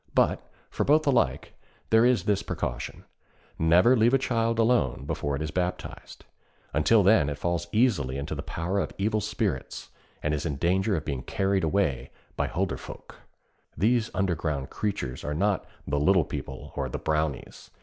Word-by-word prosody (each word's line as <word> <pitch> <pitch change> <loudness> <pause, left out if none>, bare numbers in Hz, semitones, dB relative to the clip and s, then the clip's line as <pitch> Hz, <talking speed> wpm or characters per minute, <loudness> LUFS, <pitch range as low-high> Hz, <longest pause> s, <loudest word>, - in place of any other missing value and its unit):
But, - - +3 0.3
for - - -1
both 155 +2 +3
alike, 140 -3 +1 0.4
there 110 +2 +6
is 125 -1 +2
this 100 -1 +1
precaution: - - -5 0.5
never 90 +10 +5
leave 120 +2 +4
a - - +6
child 115 -3 0
alone 115 - +2
before 75 -2 -2
it 75 - -3
is 80 - -4
baptized. 90 +1 -4 0.5
Until 100 +9 +4
then 95 -7 +4
it 70 - -4
falls 85 +1 -2
easily 100 - +2
into 70 +3 -4
the 70 - -4
power 85 +6 -2
of - - -2
evil 110 +2 0
spirits, - - -3 0.3
and 75 - 0
is 75 -1 -2
in 75 -4 -2
danger 95 +7 +1
of 80 -2 -3
being 70 -4 -3
carried 95 - 0
away 80 -5 0 0.3
by - - 0
Hulderfolk. 90 +2 -4 0.6
These 110 +5 +2
underground 80 -7 -1
creatures 80 -12 -3
are 75 - -3
not 100 +3 0 0.2
'the 70 +1 0
little 90 +1 +4
people,' - - -7
or - - -2
the - - -4
Brownies. 75 -2 -3
90 Hz, 165 wpm, -27 LUFS, 75-110 Hz, 0.6 s, there